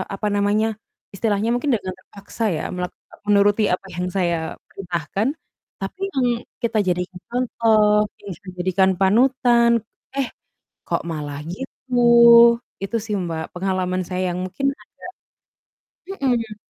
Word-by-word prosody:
apa 210 Hz, +2 st, -2 dB
namanya, 205 Hz, +2 st, +2 dB, 0.5 s
istilahnya 210 Hz, +1 st, 0 dB
mungkin 265 Hz, +3 st, 0 dB
dengan 190 Hz, -4 st, -4 dB
terpaksa 200 Hz, +4 st, -8 dB
ya, -, -, -4 dB
melak 180 Hz, 0 st, -4 dB, 0.3 s
menuruti 205 Hz, +1 st, +4 dB
apa 195 Hz, -, -3 dB
yang 180 Hz, 0 st, -2 dB
saya 175 Hz, -3 st, +1 dB, 0.3 s
perintahkan, 180 Hz, -, -3 dB, 0.5 s
tapi 380 Hz, -, -6 dB
yang 260 Hz, -2 st, +1 dB, 0.4 s
kita 225 Hz, -2 st, +1 dB
jadikan 180 Hz, +1 st, -2 dB
contoh, 220 Hz, -4 st, +3 dB, 0.2 s
yang 200 Hz, -, -7 dB
kita 190 Hz, -, -12 dB
jadikan 190 Hz, +1 st, +3 dB
panutan, 235 Hz, +3 st, +4 dB, 0.4 s
eh, 275 Hz, -3 st, -1 dB, 0.6 s
kok -, -, -1 dB
malah 145 Hz, -2 st, -5 dB
gitu. 265 Hz, +2 st, -8 dB, 0.9 s
Itu 195 Hz, +4 st, -2 dB
sih, 215 Hz, -2 st, -3 dB
Mbak, 165 Hz, -3 st, -3 dB
pengalaman 185 Hz, 0 st, -1 dB
saya 185 Hz, -1 st, -1 dB
yang 180 Hz, -, -3 dB
mungkin 275 Hz, +9 st, -3 dB
agak -, -, -22 dB, 1.3 s
mhm. 230 Hz, -5 st, 0 dB
200 Hz, 125 wpm, -22 LUFS, 185-230 Hz, 1.3 s, menuruti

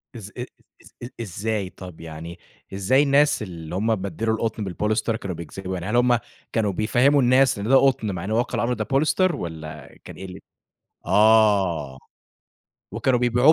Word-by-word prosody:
إز 105 Hz, -3 st, -9 dB
أ 125 Hz, -, -4 dB, 0.4 s
إز -, -, -18 dB
إز 120 Hz, -, -6 dB
إزاي؟ 105 Hz, -1 st, -3 dB
طب 90 Hz, -3 st, -11 dB
يعني 80 Hz, +2 st, -9 dB, 0.3 s
إزاي 100 Hz, +9 st, +3 dB
الناس 145 Hz, -2 st, +3 dB
اللي 85 Hz, -4 st, -7 dB
هم 110 Hz, +3 st, +1 dB
بدّلوا 100 Hz, +3 st, -2 dB
القُطن 110 Hz, -1 st, -3 dB
بالبوليستر 105 Hz, +4 st, -1 dB
كانوا 100 Hz, -6 st, -5 dB
بيكذبوا؟ 90 Hz, +4 st, -7 dB
يعني 90 Hz, 0 st, -4 dB
هل 120 Hz, -, -1 dB
هم 120 Hz, -1 st, +4 dB, 0.3 s
كانوا 105 Hz, -3 st, 0 dB
بيفهّموا 125 Hz, +8 st, +3 dB
الناس 130 Hz, -2 st, +4 dB
إن 105 Hz, -, -4 dB
ده 135 Hz, -, +5 dB
قُطن 130 Hz, -6 st, +3 dB
مع 90 Hz, -3 st, -5 dB
إنه 110 Hz, +3 st, -2 dB
واقع 120 Hz, -, 0 dB
الأمر 120 Hz, +1 st, 0 dB
ده -, -, -2 dB
بوليستر 155 Hz, +5 st, +1 dB
والّا 80 Hz, -, -8 dB
كان -, -, -10 dB
إيه 95 Hz, -, -8 dB
ال 95 Hz, 0 st, -9 dB, 0.7 s
آه. 100 Hz, -10 st, +3 dB, 1.0 s
وكانوا 130 Hz, -2 st, +1 dB
بيبيعوه 125 Hz, +5 st, +4 dB
110 Hz, 170 wpm, -23 LUFS, 90-125 Hz, 1.0 s, ده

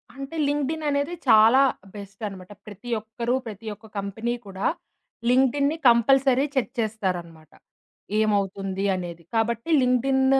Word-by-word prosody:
అంటే 275 Hz, +4 st, -7 dB
లింక్డ్ఇన్ 295 Hz, +2 st, -1 dB
అనేది 285 Hz, +4 st, -1 dB
చాలా 225 Hz, +4 st, +7 dB, 0.3 s
బెస్టన్నమాట. 195 Hz, -1 st, -8 dB, 0.2 s
ప్రతి 210 Hz, +4 st, -10 dB
ఒక్కరు 235 Hz, +3 st, -2 dB
ప్రతి 220 Hz, 0 st, -8 dB
ఒక్క 215 Hz, +2 st, -20 dB
కంపెనీ 200 Hz, +4 st, -3 dB
కూడా 195 Hz, 0 st, -2 dB, 0.6 s
లింక్డ్ఇన్‌ని 280 Hz, +4 st, +2 dB
కంపల్సరీ 265 Hz, +3 st, +4 dB
చెక్ 260 Hz, -1 st, 0 dB
చేస్తారన్నమాట. 180 Hz, -8 st, -3 dB, 0.7 s
ఏమవుతుంది 195 Hz, -2 st, 0 dB
అనేది. 175 Hz, -2 st, -6 dB
కాబట్టి 230 Hz, +5 st, 0 dB
లింక్డ్ఇన్ 265 Hz, +1 st, +2 dB
225 Hz, 110 wpm, -24 LUFS, 200-265 Hz, 0.7 s, చాలా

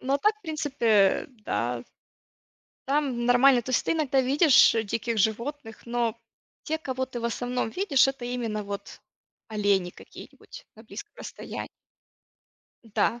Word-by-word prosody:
Ну 265 Hz, +1 st, -2 dB
а 280 Hz, -, +1 dB
так, 425 Hz, +7 st, +3 dB
в -, -, -37 dB
принципе, 295 Hz, -6 st, -3 dB
э, 200 Hz, -3 st, +4 dB, 0.2 s
да. 120 Hz, +3 st, -2 dB, 1.1 s
Там 270 Hz, -4 st, 0 dB
нормально. 245 Hz, 0 st, +5 dB
То 255 Hz, -, -6 dB
есть 255 Hz, -, +1 dB
ты -, -, +1 dB
иногда 285 Hz, -4 st, +1 dB
видишь, 275 Hz, 0 st, +5 dB
э, 225 Hz, -1 st, 0 dB
диких 225 Hz, +2 st, -2 dB
животных, 225 Hz, +3 st, -2 dB
но 235 Hz, -2 st, -1 dB, 0.5 s
те, 315 Hz, +1 st, -2 dB
кого 260 Hz, -4 st, -3 dB
ты, 255 Hz, -2 st, -7 dB
в -, -, -6 dB
основном, 245 Hz, 0 st, -2 dB
видишь- 330 Hz, -, +3 dB
это 270 Hz, -2 st, -4 dB
именно 230 Hz, -4 st, -3 dB
вот 200 Hz, 0 st, -7 dB, 0.5 s
олени 205 Hz, -4 st, +1 dB
какие-нибудь -, -, -13 dB
на 220 Hz, -, -14 dB
близком 410 Hz, -, -10 dB
расстоянии. -, -, -7 dB, 1.2 s
Да, 230 Hz, +2 st, 0 dB
245 Hz, 150 wpm, -26 LUFS, 220-275 Hz, 1.2 s, нормально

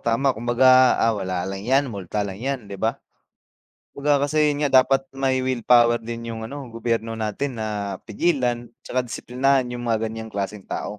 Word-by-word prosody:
tama. 130 Hz, +4 st, +1 dB
Kumbaga, 130 Hz, +2 st, +5 dB
ah, 115 Hz, 0 st, +2 dB
wala 95 Hz, -1 st, -2 dB
lang 95 Hz, 0 st, -5 dB
'yan, 135 Hz, +6 st, +2 dB
multa 100 Hz, +1 st, -3 dB
lang 100 Hz, +1 st, -7 dB
'yan, 135 Hz, -3 st, -3 dB
'di 100 Hz, -1 st, -9 dB
ba. 115 Hz, +4 st, 0 dB, 0.9 s
Kumbaga 145 Hz, 0 st, +1 dB
kasi, 150 Hz, -1 st, +3 dB
'yon 145 Hz, -, -5 dB
nga 145 Hz, -, +2 dB, 0.2 s
dapat 135 Hz, 0 st, +2 dB
may 135 Hz, -1 st, 0 dB
willpower 120 Hz, -2 st, +4 dB
din 115 Hz, 0 st, -7 dB
'yong 110 Hz, -1 st, -5 dB
ano 140 Hz, 0 st, -8 dB
gobyerno 115 Hz, -1 st, -2 dB
natin 115 Hz, +4 st, -3 dB
na 105 Hz, -3 st, -3 dB
pigilan 120 Hz, -2 st, 0 dB, 0.2 s
'tsaka 130 Hz, -, 0 dB
disiplinahin 130 Hz, +1 st, 0 dB
'yong 120 Hz, -, -5 dB
mga 115 Hz, -2 st, 0 dB
ganiyang 110 Hz, 0 st, -6 dB
klaseng 100 Hz, 0 st, -4 dB
tao. -, -, -3 dB
120 Hz, 175 wpm, -23 LUFS, 110-130 Hz, 0.9 s, Kumbaga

